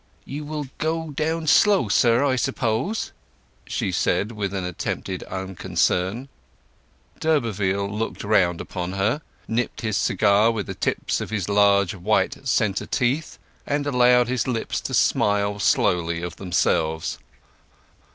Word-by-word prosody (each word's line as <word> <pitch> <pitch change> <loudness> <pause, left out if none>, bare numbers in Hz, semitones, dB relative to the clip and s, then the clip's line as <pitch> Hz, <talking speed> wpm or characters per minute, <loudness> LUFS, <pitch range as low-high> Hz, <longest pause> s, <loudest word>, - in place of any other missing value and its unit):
"You 145 +2 -6
will 150 -1 -4
go 160 0 -2
down 160 +3 -1
slow, 195 - +4
sir, 120 +5 +3
I 135 -2 +2
suppose?" 130 - -1 0.6
she - - -2
said 105 +3 0
with 105 -4 -3
attempted 90 0 -4
unconcern. 95 +4 -1 0.9
D'Urberville 105 -10 0
looked 105 +3 -4
round 95 -5 +2
upon 90 0 -5
her, 105 +10 0 0.3
nipped 115 +2 -2
his 110 -3 -1
cigar 105 +1 +3
with 110 -4 -2
the - - -5
tips - - -1
of - - -5
his 100 -5 -2
large 100 -2 +3
white 105 +7 0
centre 105 -5 +1
teeth, 135 +5 -1 0.3
and 145 0 0
allowed 125 -3 +4
his 125 -1 -1
lips 120 -3 -2
to - - -3
smile 100 0 +2
slowly 85 -4 +1
of 85 -1 -5
themselves. 80 -3 0
110 Hz, 130 wpm, -23 LUFS, 95-130 Hz, 0.9 s, slow